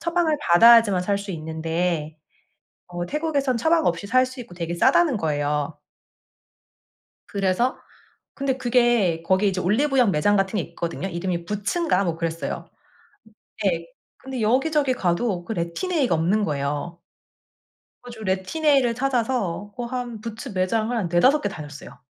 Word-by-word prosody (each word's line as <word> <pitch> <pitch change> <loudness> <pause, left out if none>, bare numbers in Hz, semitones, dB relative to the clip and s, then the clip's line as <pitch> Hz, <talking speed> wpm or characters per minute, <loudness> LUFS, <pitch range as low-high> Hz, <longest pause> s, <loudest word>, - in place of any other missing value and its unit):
처방을 335 -2 +1
받아야지만 225 0 +6
살 200 +1 0
수 200 0 -7
있는데 160 0 -2 0.7
어 175 0 -5
태국에서는 285 - -1
처방 320 +6 +2
없이 170 +3 -1
살 255 +4 +4
수 255 0 -10
있고 225 -7 -9
되게 170 -1 -4
싸다는 275 - +3
거예요. 150 -2 -1 1.5
그래서 200 +5 0 0.6
근데 275 -1 -1
그게 240 -9 +2
거기 190 +4 +2
이제 185 -1 -2
올리브영 245 +4 +2
매장 195 +6 +2
같은 195 +1 0
게 - - 0
있거든요. 170 +2 -4
이름이 170 -1 -3
부츠인가 210 - 0
뭐 170 -3 -1
그랬어요. 165 0 -4 0.9
네. 170 -4 0 0.3
근데 265 -2 -6
여기저기 270 +5 +2
가도 180 -1 -1
그 225 - -5
레틴A가 225 - -1
없는 180 +7 +1
거예요. 145 +2 -3 1.1
그래 245 - -10
가지고 220 -2 -10
레틴A를 245 +7 +2
찾아서 235 -7 -1
어 245 - -3
한 240 -2 -5
부츠 230 +3 -7
매장을 215 +4 0
한 215 -6 -1
4-5 255 - +4
개 205 - -1
다녔어요. 145 -5 -10
205 Hz, 310 characters per minute, -23 LUFS, 170-255 Hz, 1.5 s, 받아야지만